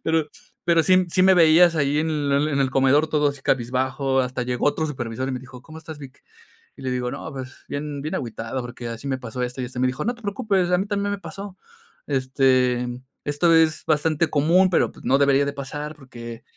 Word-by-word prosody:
Pero 160 -2 +1 0.4
pero 170 -1 +4
sí 185 -1 +4
sí 185 - +3
me 190 0 +6
veías 170 0 +6
ahí 145 -1 +1
en 160 +1 0
el 145 -1 +1
en 140 -2 0
el 130 -1 +1
comedor 135 +4 +3
todo 150 -1 +2
así 140 -1 -11
cabizbajo, 130 +2 0
hasta 125 0 -2
llegó 125 +2 -1
otro 150 +2 +1
supervisor 130 -3 -4
y - - -2
me 125 - -4
dijo: 130 -1 -12
"¿Cómo 160 +4 -12
estás, 160 -1 -9
Vic?" 135 -3 -12 0.5
Y - - -14
le 130 - -3
digo: 125 -1 -2
"No, - - -6
pues 130 -1 -9
bien 145 -1 -4
bien 155 - -3
agüitado, 115 +1 -4
porque 120 0 -7
así 115 +3 -7
me 130 -1 -2
pasó 125 0 -5
esto 125 +1 -4
y - - -2
esto". 125 0 -9
Y - - -1
me 130 - +3
dijo: 130 +4 -3
"No 240 +3 -1
te 235 - -19
preocupes, 200 -4 0
a 180 - +3
mí 200 - -2
también 205 0 -1
me 200 - -3
pasó. 195 +3 -8 0.5
Este, 130 -2 +2 0.4
esto 145 +4 +2
es 160 -1 +3
bastante 155 +1 +1
común, 170 +6 +3
pero 175 - +2
pues - - -16
no 135 - +4
debería 140 0 +4
de 140 - -2
pasar 145 +2 -6
porque 120 -3 -10
140 Hz, 230 wpm, -23 LUFS, 130-160 Hz, 0.5 s, me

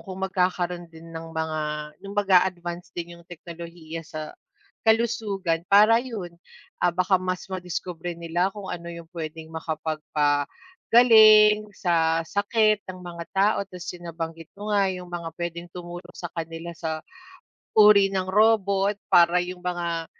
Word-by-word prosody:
kung 190 -4 -9
magkakaroon 180 -2 -1
din 165 0 -13
ng 165 0 -7
mga 160 -1 -2 0.4
yung 200 0 -8
mag-aadvance 180 -3 +1
din 175 0 -5
yung 170 - -20
teknolohiya 170 -1 -8
sa 155 -1 -7 0.5
kalusugan 215 -7 +1
para 215 +3 +6
yun, 220 -9 -6 0.5
ah, - - +3
baka 185 +2 +2
mas 185 0 -3
madiskubre 175 -1 -5
nila 170 +2 0
kung 205 0 -9
ano 170 0 -6
yung 170 -1 -8
pwedeng 160 -1 -7
makapagpagaling 210 - +3
sa 165 -2 +1
sakit 210 +3 +2
ng 185 - -6
mga 170 -1 -7
tao, 205 +3 +3
ta’s 180 -2 -7
yung 175 -1 -10
nabanggit 165 -1 -6
mo 210 +1 -4
nga, 200 -1 +3
yung 180 -1 -5
mga 170 -1 -4
pwedeng 170 0 -5
tumulong 175 0 -9
sa 175 - -7
kanila 165 0 -6
sa, 160 -1 -5 0.7
uri 210 -2 +8
ng 190 -1 -1
robot 200 -1 +3 0.2
para 175 0 +6
yung 180 +1 -6
mga 170 -2 -2
175 Hz, 140 wpm, -25 LUFS, 165-200 Hz, 0.7 s, uri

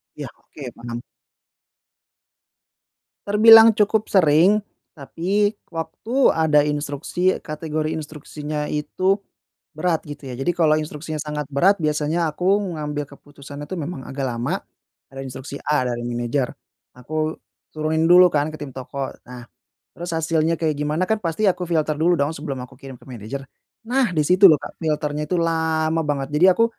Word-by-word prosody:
Ya. - - -6
Oke - - -10
paham. 120 0 -7 2.3
Terbilang 225 +1 +8
cukup 215 +1 +1
sering, 185 +4 +4 0.3
tapi 190 +8 0 0.2
waktu 165 - -6 0.2
ada 155 -2 +3
instruksi, 150 +5 -1
kategori 155 0 -3
instruksinya 150 -1 -5
itu 185 +6 0 0.6
berat 165 +1 0
gitu 145 -2 -8
ya. - - -6
Jadi 155 +6 +1
kalau 155 -3 +3
instruksinya 155 0 -5
sangat 150 -1 -4
berat, 185 +9 +4
biasanya 155 +2 0
aku 190 +6 +2 0.2
ngambil 150 0 -3
keputusannya 145 0 -11
tuh 185 -3 -5
memang 145 -3 -6
agak 135 0 -4
lama. 120 0 -3 0.5
Ada 135 0 -7
instruksi 130 +2 -7
A 150 -3 +2
dari 120 0 -4
manajer, 120 +2 -2 0.4
aku 155 +5 -3 0.4
turunin 155 +1 0
dulu 180 +1 +8
kan 150 0 0
ke - - -7
tim 145 - -5
toko. 135 +1 -5 0.2
Nah, 125 0 -10 0.5
terus 175 +1 -6
hasilnya 160 0 +1
kayak 160 -1 0
gimana 150 +5 0
kan 220 +2 -1
pasti 170 +5 -2
aku 180 -3 +1
filter 155 -2 +1
dulu 170 +3 +3
dong 145 0 0
sebelum 145 -3 -5
aku - - -16
kirim 135 -2 -9
ke - - -20
manajer. 125 +2 -7 0.4
Nah 245 -4 +1
di 155 - +4
situ 185 +4 +7
loh 155 - +6
Kak, - - -9
filter-nya 150 -1 -1
itu 180 - 0
lama 160 -1 0
banget. 140 -2 -2
Jadi 175 +5 +5
aku 230 - +4
155 Hz, 150 wpm, -22 LUFS, 145-175 Hz, 2.3 s, Terbilang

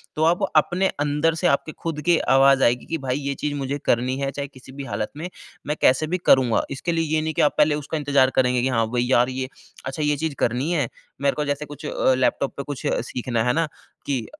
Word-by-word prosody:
तो 155 - 0
आप 170 +2 +3
अपने 180 +5 +3
अंदर 150 +3 +1
से - - +1
आपके 155 +3 -1
खुद 155 -2 -5
के 170 +2 +3 0.2
आवाज़ 135 0 +5
आएगी 120 +1 +2
कि 165 - -2
भई 130 -2 -2
ये 140 0 -2
चीज़ 150 -1 -3
मुझे 140 0 -2
करनी 125 +2 +1
है, 135 0 -1
चाहे 140 0 -4
किसी 130 -1 -15
भी 140 +1 -7
हालत 110 -4 -3
में, 175 +4 -5 0.4
मैं 150 - 0
कैसे 135 +4 +4
भी 180 +3 -1
करूँगा। 125 -4 +4
इसके 155 +5 -2
लिए 165 -1 0
ये 155 - +2
नहीं 160 0 -2
कि - - +1
आप 150 - +3
पहले 150 0 +4
उसका 150 +2 -4
इंतज़ार 140 -3 +3
करेंगे, 125 -1 +3
कि 130 - +1
हाँ 115 -3 +1
भई 120 -1 +1
यार 125 0 +3
ये 130 0 -3 0.4
अच्छा 135 +3 -3
ये 150 0 +2
चीज़ 160 -1 -2
करनी 125 +8 0
है। 145 -8 +1 0.3
मेरे 140 0 +2
को 150 - -1
जैसे 145 +1 -2
कुछ 145 +1 -10
अ, 130 - +2
लैपटॉप 130 +1 0
पे 140 - -3
कुछ 145 -2 -6
अ, - - +1
सीखना 120 -2 -2
है 125 - +2
ना? 165 0 +1 0.4
कि 130 -5 -1
140 Hz, 245 wpm, -23 LUFS, 130-150 Hz, 0.4 s, आवाज़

